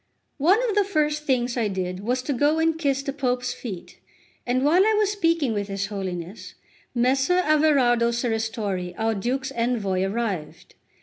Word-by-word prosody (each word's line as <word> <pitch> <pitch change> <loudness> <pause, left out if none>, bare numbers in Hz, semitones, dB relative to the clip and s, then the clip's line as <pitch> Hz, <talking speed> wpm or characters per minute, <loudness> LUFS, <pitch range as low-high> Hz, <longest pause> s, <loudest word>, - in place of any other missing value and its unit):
LXXXI - - -6
ONE 410 +7 +5
of 415 - -1
the 410 - +4
first 300 -5 -1
things 250 -3 0
I 235 -3 0
did 185 -2 -3
was 250 +5 -1
to 285 - -1
go 290 +5 +2
and 325 0 +2
kiss 280 -4 0
the 275 - -3
Pope's 250 -3 -1
feet; 195 -8 -8 0.5
and 255 +2 +1
while 345 +6 +5
I 435 +1 +3
was 420 -1 +2
speaking 330 - +1
with 205 -1 -2
his 195 -1 -3
Holiness, 190 -2 -6 0.4
Messer 265 +8 +2
Averardo 275 -6 +3
Serristori, 220 -6 -2
our 225 0 0
Duke's 260 +6 -2
Envoy, 230 -7 -1
arrived. 195 -5 -3
245 Hz, 170 wpm, -24 LUFS, 210-295 Hz, 0.5 s, ONE